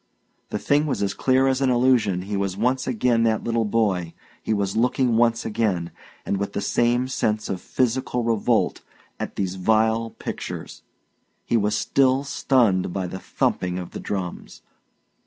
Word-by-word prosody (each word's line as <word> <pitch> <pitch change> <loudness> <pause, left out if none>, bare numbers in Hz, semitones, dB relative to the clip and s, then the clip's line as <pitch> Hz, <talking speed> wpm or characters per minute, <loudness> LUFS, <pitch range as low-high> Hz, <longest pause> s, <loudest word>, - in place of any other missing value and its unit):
The - - -2
thing 145 +2 +1
was 135 - -1
as 100 - 0
clear 130 0 +2
as 135 0 +1
an 135 - +3
illusion 120 -7 +2
He 100 +2 -4
was 100 -1 -2
once 125 +4 0
again 120 -1 +2
that 110 -1 +1
little 115 -1 0
boy; 100 -6 0 0.3
he - - -3
was 100 -2 0
looking 125 +1 +2
once 115 0 +2
again, 105 -6 -1 0.3
and 100 - -1
with 100 +1 -3
the - - -1
same 120 +4 +1
sense 110 -4 -1
of 95 -2 -3
physical 125 -1 -1
revolt, 115 -2 +1 0.4
at - - -5
these 95 -1 -2
vile 110 +3 +2
pictures; - - -7 0.6
he - - 0
was 105 -1 +2
still 135 +3 +2
stunned 120 -10 +2
by 95 +1 -2
the 95 +1 -6
thumping 90 -1 -1
of 90 -1 -6
the - - -6
drums. 95 -4 -5
110 Hz, 165 wpm, -23 LUFS, 100-125 Hz, 0.6 s, an